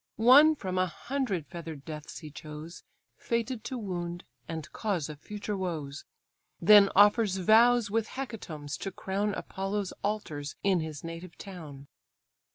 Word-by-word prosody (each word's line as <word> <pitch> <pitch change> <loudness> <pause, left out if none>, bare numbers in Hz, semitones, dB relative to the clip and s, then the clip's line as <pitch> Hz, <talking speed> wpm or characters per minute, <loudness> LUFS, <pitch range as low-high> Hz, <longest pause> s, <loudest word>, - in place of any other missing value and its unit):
One 280 +7 +7
from 185 -8 -3
a 185 - +3
hundred 230 - -3
feather'd 160 -5 -8
deaths 155 -1 -7
he 155 -2 -9
chose, 155 +3 -9 0.3
Fated 235 0 -2
to 260 - -3
wound, 175 -5 -4 0.2
and 160 -2 -5
cause 185 -9 -1
of 150 -1 -8
future 210 +4 -5
woes; 160 -7 -4 0.5
Then 205 -2 +8
offers 205 0 +5
vows 225 +3 +5
with 225 0 +1
hecatombs 165 - -6
to 195 - -3
crown 195 +2 -2
Apollo's 195 0 -3
altars 155 -9 -3
in 195 -3 +3
his 155 -3 -5
native 165 +1 -8
town. 155 -8 -9
190 Hz, 140 wpm, -29 LUFS, 160-215 Hz, 0.5 s, Then